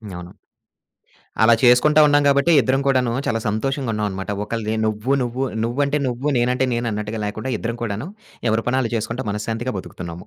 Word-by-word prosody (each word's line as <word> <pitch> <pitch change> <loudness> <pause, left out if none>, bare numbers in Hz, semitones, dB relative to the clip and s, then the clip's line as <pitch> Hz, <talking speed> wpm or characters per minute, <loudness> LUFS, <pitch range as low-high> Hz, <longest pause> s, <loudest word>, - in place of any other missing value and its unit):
అవును. 90 0 -9 1.1
అలా 115 +1 +7
చేసుకుంటా 125 +5 +5
ఉన్నాం 145 0 +4
గాబట్టే 140 +4 +4
ఇద్దరం 130 +2 +1
కూడాను 130 -3 +2
చాలా 115 0 0
సంతోషంగున్నావనమాట. 110 -4 -2 0.2
ఒకళ్ళది 110 0 -3
నువ్వు 110 +5 -1
నువ్వు 125 +2 -2 0.2
నువ్వంటే 140 +5 0
నువ్వు, 125 +2 -3
నేనంటే 125 +2 +1
నేను 120 0 -2
అన్నట్టుగా 105 +1 -4
లేకుండా 110 +5 -4
ఇద్దరం 115 +2 -4
కూడాను 110 +6 -3 0.4
ఎవరి 110 +1 0
పనాళ్ళు 125 -2 0
చేసుకుంటా 115 +3 -3
మనశ్శాంతిగా 110 +3 -3
బతుకుతున్నాము. 90 -1 -8
115 Hz, 145 wpm, -21 LUFS, 105-130 Hz, 1.1 s, అలా